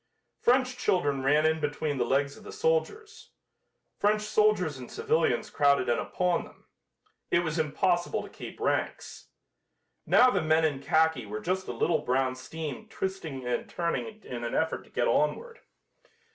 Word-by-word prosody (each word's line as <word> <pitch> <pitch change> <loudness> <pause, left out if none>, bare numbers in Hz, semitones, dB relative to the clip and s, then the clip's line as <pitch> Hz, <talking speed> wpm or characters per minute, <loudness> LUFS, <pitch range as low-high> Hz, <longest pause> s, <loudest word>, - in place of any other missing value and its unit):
French 255 0 +2
children 145 - +1
ran 150 +3 +3
in 160 0 +2
between 145 -1 -2
the - - +3
legs 140 +3 +1
of - - -15
the 425 - -9
soldiers. 445 -1 -2 0.7
French 210 +1 +2
soldiers 210 -8 +2
and 125 - -10
civilians 160 0 0
crowded 140 -3 +3
in 120 - +2
upon 180 -2 0
them. - - -17 0.6
It 170 - +3
was 160 0 -2
impossible 175 +3 0
to - - -10
keep - - -10
ranks. - - -2 0.8
Now 255 0 +6
the - - +1
men 160 +1 +3
in 145 -3 -1
khaki 160 -5 +2
were 105 +1 -4
just 185 +7 -2
a - - -3
little 165 -2 +1
brown 130 -1 0
stream 155 +9 -7
twisting 170 - -4
and 125 -1 -2
turning 215 +6 -3
in 120 -1 -6
an 115 - -3
effort 160 - -1
to - - -21
get - - 0
onward. 475 -1 0
160 Hz, 160 wpm, -28 LUFS, 140-210 Hz, 0.8 s, Now